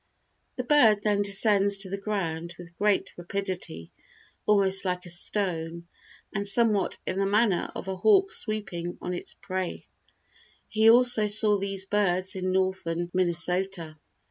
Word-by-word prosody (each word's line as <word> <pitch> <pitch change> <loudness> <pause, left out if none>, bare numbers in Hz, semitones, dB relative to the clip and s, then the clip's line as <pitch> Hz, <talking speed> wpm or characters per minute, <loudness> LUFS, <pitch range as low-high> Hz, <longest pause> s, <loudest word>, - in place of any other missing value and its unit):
The 250 - -4
bird 235 -7 +4
then 205 -1 +1
descends 200 0 +3
to 195 -1 -3
the - - -1
ground 175 -5 -4
with 170 -1 -13
great 205 +2 0
rapidity, 175 - -5 0.6
almost 195 -2 +3
like 180 -1 -3
a - - -6
stone, 170 -2 -1 0.5
and 200 +1 -3
somewhat 210 -1 +2
in 185 - -3
the 195 - +1
manner 205 -2 +1
of - - -7
a 190 -1 -4
hawk 395 - +3
sweeping 185 -6 -2
on 180 - -5
its 175 - -6
prey. 185 -2 -5 0.8
He 220 0 +3
also 240 -2 +5
saw 210 0 +3
these 195 -1 -2
birds 190 -2 0
in 185 0 -2
northern 185 -2 -2
Minnesota. 180 -2 -1
195 Hz, 145 wpm, -26 LUFS, 175-210 Hz, 0.8 s, also